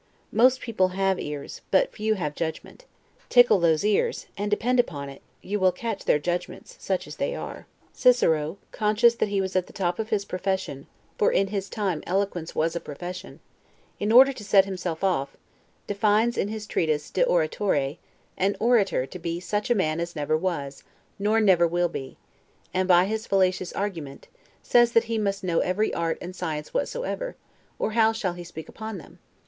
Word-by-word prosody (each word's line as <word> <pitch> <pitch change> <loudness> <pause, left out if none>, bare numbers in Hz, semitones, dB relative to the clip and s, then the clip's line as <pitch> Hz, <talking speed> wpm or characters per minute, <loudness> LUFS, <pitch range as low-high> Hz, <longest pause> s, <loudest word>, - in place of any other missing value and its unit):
Most 250 +3 +4
people 215 -6 +1
have 195 -1 +1
ears, 145 -1 -6
but - - +3
few 215 0 0
have 150 -7 -3
judgment; 165 - -5 0.4
tickle 245 -5 +6
those 165 +1 +2
ears, 210 -1 +1
and 205 +1 -2
depend 245 +4 +1
upon 145 -11 -1
it, 135 - -12 0.2
you 205 +2 -2
will 185 -1 +4
catch 215 +2 -5
their - - +4
judgments, 175 +4 -4
such - - -2
as - - -10
they - - -1
are. - - -7 0.3
Cicero, 165 - +3
conscious 215 +2 +3
that 230 - -1
he 200 -1 0
was 190 0 -2
at 185 -1 +1
the - - -15
top 175 -1 -1
of 220 0 -3
his 205 -3 0
profession 185 -8 -3 0.3
(for - - +4
in 195 0 +2
his 200 -1 -3
time 195 -8 -2
eloquence 180 -3 -2
was 165 +1 0
a - - -1
profession), 175 +5 -8 0.6
in 210 +1 0
order 265 +4 +8
to 230 - -10
set 195 -1 +5
himself 180 -3 -4
off, 140 -8 0 0.5
defines 210 +3 +2
in - - 0
his 215 0 -5
treatise 155 -6 -1
'De - - +2
Oratore', 155 -3 0 0.4
an 195 +2 +2
orator 205 - +2
to 180 - -9
be 170 0 -3
such 210 +5 -2
a 240 - +4
man 155 -5 0
as 170 0 -4
never 150 0 0
was, 155 -5 -3 0.4
nor 210 +2 +2
never 185 -5 +5
will 175 +1 +1
be; 135 -4 -7 0.6
and, 185 0 +1
by 180 0 +6
his 220 +2 -3
fallacious 185 -2 +1
argument, 170 -9 -5 0.4
says 240 -1 +4
that 230 - +5
he 230 -1 -2
must 200 -2 -1
know 170 -3 +1
every 200 +4 0
art 165 -1 -1
and 180 +1 -7
science 155 -5 -4
whatsoever, - - -3 0.4
or - - -1
how 225 0 +4
shall 215 -5 -2
he 175 0 -8
speak 160 -2 -9
upon 220 -2 -7
them? 165 - -14
190 Hz, 185 wpm, -25 LUFS, 170-215 Hz, 0.6 s, order